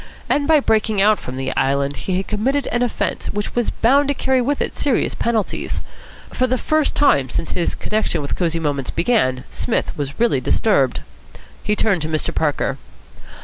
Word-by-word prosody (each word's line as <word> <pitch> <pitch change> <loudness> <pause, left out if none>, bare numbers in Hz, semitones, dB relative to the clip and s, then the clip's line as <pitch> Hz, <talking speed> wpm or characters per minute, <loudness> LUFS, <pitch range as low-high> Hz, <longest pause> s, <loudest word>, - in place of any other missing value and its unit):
And 285 -1 +1
by 315 -1 +6
breaking 220 -5 +1
out 210 +2 +4
from 125 +1 -7
the 130 0 -3
Island 140 +1 +1
he 180 +7 -2
had 190 - -2
committed 260 +6 0
an 240 - 0
offence 245 -2 -1
which 205 +1 -3
was 240 -1 0
bound 275 +5 +3
to 285 - 0
carry 260 -1 +1
with 280 +4 0
it - - -2
serious 275 -5 0
penalties. 225 -4 -1 0.5
For 255 - +1
the 255 +1 +1
first 310 +3 0
time 140 - +3
since 165 - -2
his 170 - -1
connection 215 -5 -1
with 140 -1 -3
Cosy 165 -2 0
Moments 145 -5 -2
began 165 - +1
Psmith - - -2
was 145 +3 -5
really 230 - +2
disturbed. 140 - +1 0.6
He 210 - +1
turned 200 -5 +1
to 155 - -2
Mr. 155 -1 -2
Parker. 145 -3 -1
210 Hz, 185 wpm, -20 LUFS, -, 0.6 s, by